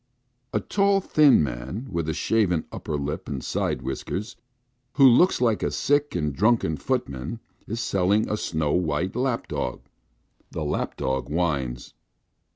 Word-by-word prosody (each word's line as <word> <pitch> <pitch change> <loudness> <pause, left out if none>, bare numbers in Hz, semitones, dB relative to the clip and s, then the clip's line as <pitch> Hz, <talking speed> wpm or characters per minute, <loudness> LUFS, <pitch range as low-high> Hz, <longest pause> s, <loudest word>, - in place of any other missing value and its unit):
A - - +1
tall 200 -1 +2
thin 150 - +5
man, 70 - -5
with 85 -2 -2
a - - 0
shaven 95 -8 +1
upper 75 - -4
lip 70 +1 -4
and 65 -3 -4
side - - -2
whiskers, 95 - -4 0.6
who 135 -2 +7
looks 150 +10 +5
like 115 -4 +2
a - - 0
sick 145 +1 +1
and 75 -2 -1
drunken 105 -3 +2
footman, 80 - -3 0.3
is 115 +2 -3
selling 100 0 +1
a 105 - -1
snow 80 -7 -1
white 90 +1 0
lap 125 -2 -1
dog. 60 - -3 0.7
The 80 - -5
old 75 -1 -1
lap - - -2
dog 65 0 -2
whines. 70 -7 -2
90 Hz, 155 wpm, -25 LUFS, 75-120 Hz, 0.7 s, who